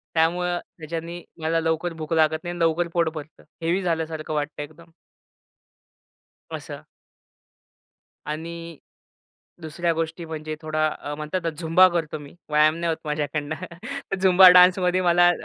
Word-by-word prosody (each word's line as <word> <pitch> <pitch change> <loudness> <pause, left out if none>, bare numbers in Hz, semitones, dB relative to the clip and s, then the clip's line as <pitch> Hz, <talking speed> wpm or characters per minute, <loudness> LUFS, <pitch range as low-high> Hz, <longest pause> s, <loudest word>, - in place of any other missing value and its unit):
त्यामुळं 175 +2 +1 0.2
त्याच्यानी 165 +2 -6 0.2
मला 165 +1 +1
लवकर 165 +1 -1
भूक 160 0 -5
लागत 160 0 +2
नाही 175 - -4
आणि 175 - -7
लवकर 165 +1 +2
पोट 170 -2 +2
भरतं 155 0 -10 0.2
हेवी 170 +4 0
झाल्यासारखं 160 -3 -2
वाटत 150 0 -3
एकदम. 155 +3 -9 1.6
असं. - - -7 1.4
आणि 165 +2 -6 0.8
दुसऱ्या 170 +1 -1
गोष्टी 165 +1 -3
म्हणजे 155 -1 -5
थोडा 155 0 0
अ, 145 - -5
म्हणतात 165 +3 -3
झुंबा 175 +3 +6
करतो 165 -3 -2
मी 145 -1 -12 0.2
व्यायाम 150 +1 +4
नाही 170 0 -2
होत - - -7
माझ्याकडनं, 150 0 -2 0.7
झुंबा 185 0 +8
डान्समध्ये 180 0 +5
मला 175 0 +5
165 Hz, 130 wpm, -24 LUFS, 155-175 Hz, 1.6 s, झुंबा